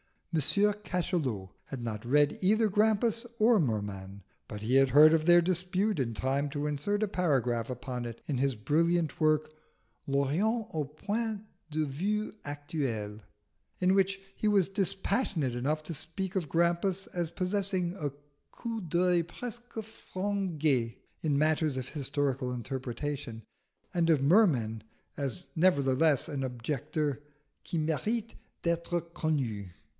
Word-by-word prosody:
M. 160 Hz, -, +3 dB
Cachalot 180 Hz, -, 0 dB, 0.2 s
had 130 Hz, -3 st, -6 dB
not 110 Hz, -1 st, -4 dB
read 145 Hz, +3 st, +3 dB
either 215 Hz, +3 st, +4 dB
Grampus 220 Hz, +3 st, +2 dB
or 225 Hz, 0 st, +5 dB
Merman, 100 Hz, -, -3 dB, 0.2 s
but 105 Hz, -, -7 dB
he 120 Hz, +5 st, +3 dB
heard 145 Hz, +4 st, +7 dB
of 160 Hz, -1 st, +2 dB
their 175 Hz, 0 st, +7 dB
dispute 185 Hz, +3 st, 0 dB
in 120 Hz, -3 st, 0 dB
time 135 Hz, +5 st, 0 dB
to 145 Hz, +1 st, -2 dB
insert 205 Hz, +9 st, 0 dB
a -, -, +2 dB
paragraph 130 Hz, -, +1 dB
upon 125 Hz, -1 st, -4 dB
it 115 Hz, -1 st, -7 dB
in 140 Hz, -, -1 dB
his 135 Hz, 0 st, +1 dB
brilliant 165 Hz, +7 st, +1 dB
work, 155 Hz, -1 st, +2 dB, 0.6 s
L'orient 170 Hz, -, +1 dB
au 155 Hz, -2 st, -1 dB
point 210 Hz, +9 st, -3 dB, 0.3 s
de 155 Hz, 0 st, 0 dB
vue 200 Hz, +10 st, -1 dB
actuel, 135 Hz, -8 st, -3 dB, 0.6 s
in 185 Hz, +1 st, +3 dB
which 195 Hz, 0 st, +2 dB, 0.2 s
he 215 Hz, -, 0 dB
was 200 Hz, -4 st, +4 dB
dispassionate 195 Hz, -, 0 dB
enough 145 Hz, +6 st, -1 dB
to 165 Hz, -, -5 dB
speak 185 Hz, +5 st, -4 dB
of 165 Hz, -6 st, -2 dB
Grampus 175 Hz, +4 st, +1 dB
as 175 Hz, -2 st, -2 dB
possessing 185 Hz, 0 st, -1 dB
a 145 Hz, -3 st, -1 dB, 0.4 s
coup 230 Hz, -2 st, -4 dB
d'oeil 175 Hz, 0 st, +2 dB
presque 240 Hz, +7 st, -8 dB
français 185 Hz, -, -1 dB, 0.2 s
in 150 Hz, -3 st, +1 dB
matters 155 Hz, -1 st, +2 dB
of 130 Hz, -1 st, -4 dB
historical 140 Hz, -3 st, -1 dB
interpretation, 130 Hz, -1 st, -4 dB, 0.5 s
and 170 Hz, -1 st, +2 dB
of 150 Hz, -4 st, +4 dB
Merman 140 Hz, -, +4 dB, 0.4 s
as 140 Hz, +5 st, -3 dB
nevertheless 145 Hz, -4 st, +3 dB
an 145 Hz, -3 st, -3 dB
objector 145 Hz, +3 st, -2 dB, 0.5 s
qui 170 Hz, -, -1 dB
mérite 210 Hz, +9 st, -1 dB, 0.3 s
d'être 170 Hz, 0 st, -1 dB
connu. 125 Hz, -, -1 dB
155 Hz, 130 wpm, -30 LUFS, 135-185 Hz, 0.6 s, heard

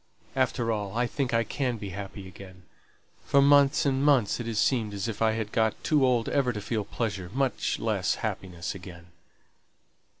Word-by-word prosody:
After 120 Hz, -3 st, +1 dB
all, 105 Hz, -1 st, -3 dB
I 120 Hz, -, +2 dB
think 130 Hz, +1 st, -2 dB
I 115 Hz, 0 st, +2 dB
can 125 Hz, +1 st, -2 dB
be 100 Hz, -2 st, -6 dB
happy 100 Hz, 0 st, -7 dB
again; 95 Hz, 0 st, -13 dB, 0.6 s
for 140 Hz, -, +3 dB
months 140 Hz, 0 st, +5 dB
and 135 Hz, -1 st, +1 dB
months 135 Hz, -8 st, +3 dB
it 120 Hz, -, -4 dB
has 115 Hz, -2 st, -3 dB
seemed 110 Hz, -3 st, +1 dB
as 100 Hz, +3 st, -3 dB
if 115 Hz, -2 st, -5 dB
I 110 Hz, -1 st, +3 dB
had 110 Hz, -1 st, -3 dB
got 110 Hz, -2 st, 0 dB
too 150 Hz, -4 st, +3 dB
old 125 Hz, -3 st, +2 dB
ever 135 Hz, -3 st, +1 dB
to 105 Hz, -, -4 dB
feel 105 Hz, +1 st, -2 dB
pleasure, 100 Hz, -4 st, -4 dB
much 135 Hz, -1 st, 0 dB
less -, -, 0 dB
happiness 90 Hz, -2 st, -4 dB
again." 85 Hz, -3 st, -11 dB
115 Hz, 180 wpm, -27 LUFS, 100-130 Hz, 0.6 s, months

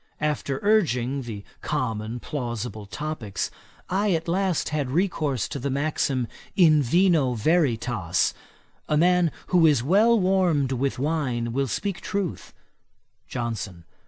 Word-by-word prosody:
After 145 Hz, -3 st, -1 dB
urging 140 Hz, -, +2 dB
the 110 Hz, -5 st, -7 dB, 0.2 s
common 115 Hz, -5 st, -2 dB
plausible 120 Hz, -6 st, -5 dB
topicks, 140 Hz, -5 st, -4 dB, 0.4 s
I 195 Hz, +1 st, +1 dB
at 165 Hz, 0 st, -1 dB
last 185 Hz, -1 st, 0 dB
had 150 Hz, -4 st, -1 dB
recourse 150 Hz, -, 0 dB
to 140 Hz, -, -4 dB
the 140 Hz, +3 st, -2 dB
maxim, 135 Hz, -3 st, 0 dB, 0.3 s
in 155 Hz, -5 st, +6 dB
vino 155 Hz, -2 st, +3 dB
veritas, 115 Hz, -, +1 dB, 0.6 s
a 150 Hz, -, +3 dB
man 175 Hz, 0 st, +4 dB, 0.2 s
who 175 Hz, -3 st, +5 dB
is 145 Hz, -6 st, +3 dB
well 215 Hz, -, +4 dB
warmed 180 Hz, -8 st, +2 dB
with 135 Hz, +1 st, -1 dB
wine 130 Hz, -5 st, -1 dB
will 135 Hz, +1 st, 0 dB
speak 190 Hz, -, -3 dB
truth. 195 Hz, -4 st, -3 dB, 0.8 s
JOHNSON. 105 Hz, -7 st, -4 dB
145 Hz, 125 wpm, -25 LUFS, 120-175 Hz, 0.8 s, in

